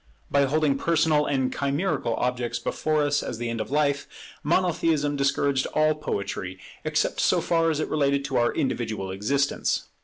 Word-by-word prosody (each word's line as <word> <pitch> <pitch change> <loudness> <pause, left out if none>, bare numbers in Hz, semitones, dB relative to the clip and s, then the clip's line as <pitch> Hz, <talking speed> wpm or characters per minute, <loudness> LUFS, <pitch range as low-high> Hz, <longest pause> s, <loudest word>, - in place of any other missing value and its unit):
By 140 0 +4
holding 145 0 +1
personal 155 -2 +2
and 130 -2 0
chimerical 140 -4 -1
objects 125 -1 -1
before 155 -1 0
us 145 0 +1
as 115 - -5
the 120 0 -3
end 115 -1 -2
of - - -5
life, 140 0 +1 0.3
Monotheism 160 -3 +1
discouraged 140 -1 +1
all 155 0 +4
poetry, 100 -9 -4 0.3
except - - 0
so - - +3
far 165 -1 +2
as 155 -2 0
it 155 - -1
related 140 -2 +1
to 135 -2 -1
our 120 0 +3
individual 110 -7 -2
existence. 135 +9 0
140 Hz, 160 wpm, -25 LUFS, 125-155 Hz, 0.3 s, By